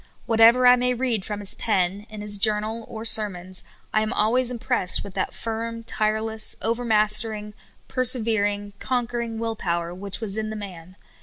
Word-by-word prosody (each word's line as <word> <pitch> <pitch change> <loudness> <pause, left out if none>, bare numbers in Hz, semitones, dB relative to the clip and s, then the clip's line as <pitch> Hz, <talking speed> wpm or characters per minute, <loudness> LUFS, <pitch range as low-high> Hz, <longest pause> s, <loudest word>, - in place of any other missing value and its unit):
Whatever 230 +2 +5
I 250 0 +7
may 250 0 0
read 240 -5 0
from 210 -1 -5
his 200 - +1
pen, 200 -1 -1
in 215 -1 -8
his 205 -1 0
journal, 215 +2 +1
or 220 0 -8
sermons, 185 -5 +2 0.3
I 215 - +3
am 215 - -2
always 240 +4 +2
im 250 - -2
pressed 185 -4 +3
with 200 - -10
that - - -2
firm, 230 0 -5
tireless, 220 0 0
overmastering, 215 -2 +1 0.3
perse 255 -1 +4
vering, 205 -3 -1
conquering 240 -2 -3
will 225 0 -3
power 170 -3 -3
which 195 +2 -5
was 215 -1 -2
in 215 0 -3
the 220 - -5
man. 185 -4 -9
215 Hz, 170 wpm, -23 LUFS, 205-230 Hz, 0.3 s, I